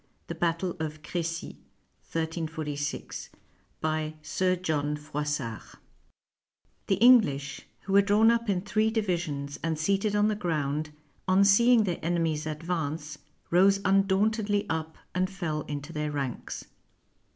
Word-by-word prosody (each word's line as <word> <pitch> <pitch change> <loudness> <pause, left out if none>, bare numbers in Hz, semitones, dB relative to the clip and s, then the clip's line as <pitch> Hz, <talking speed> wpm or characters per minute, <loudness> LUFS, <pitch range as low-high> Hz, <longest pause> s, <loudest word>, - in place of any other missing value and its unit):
THE - - -5
BATTLE 170 +2 -1
OF 155 -1 -5
CRECY 165 -1 -4 2.2
BY 155 0 -1
SIR 185 +2 +1
JOHN 150 -4 -1
FROISSART 150 -6 -4 1.1
The 195 - +3
English, 190 - +4
who 195 - -4
were 200 - +8
drawn 210 +3 +5
up 235 -1 0
in 185 -3 +1
three 215 +2 +1
divisions 170 -10 -2
and 160 -1 -1
seated 195 +6 +1
on 205 0 +4
the 215 - +1
ground, 155 -6 -1 0.4
on 190 +1 +5
seeing 235 +3 +6
their 180 -4 -2
enemies 165 -2 0
advance, 155 -1 -3 0.3
rose 195 +3 +5
undauntedly 200 +2 +2
up 160 0 -3 0.2
and 185 +1 +1
fell 170 -6 -3
into 145 +2 -5
their 150 0 -2
ranks. 140 -4 -4
170 Hz, 120 wpm, -28 LUFS, 150-200 Hz, 2.2 s, were